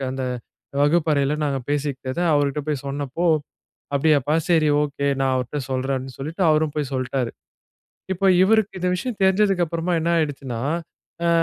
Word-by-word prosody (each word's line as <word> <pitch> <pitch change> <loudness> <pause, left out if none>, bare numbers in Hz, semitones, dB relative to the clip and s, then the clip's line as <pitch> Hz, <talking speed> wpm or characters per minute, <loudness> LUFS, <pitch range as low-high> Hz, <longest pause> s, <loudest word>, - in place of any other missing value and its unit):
அந்த 130 -1 -3 0.6
வகுப்பறைல 150 -2 +2
நாங்க 140 -2 0
பேசிக்கிட்டத, 140 0 -2
அவருட்ட 145 0 +1
போய் 145 -3 -1
சொன்னப்போ, 145 +4 -2 0.7
அப்டியாப்பா, 150 0 +2
சரி, 160 -3 +4
ஓகே. 140 -1 -2
நான் 135 -1 +2
அவருட்ட 130 +3 -2
சொல்றேன்னு, 130 0 -2
சொல்லிட்டு, 160 +7 -3
அவரும் 155 -1 +2
போய் 145 -2 -1
சொல்லிட்டாரு. 130 -1 -1 0.8
இப்போ, 195 +2 0 0.2
இவருக்கு 210 -1 +2
இந்த 180 - +1
விஷயம் 215 +5 -4
தெரிஞ்சதுக்கு 190 -1 +3
அப்புறமா, 170 +2 -2
என்ன 165 - -1
ஆயிடுச்சுன்னா, 135 -6 -3 0.7
அ - - +3
145 Hz, 135 wpm, -23 LUFS, 135-170 Hz, 0.8 s, சரி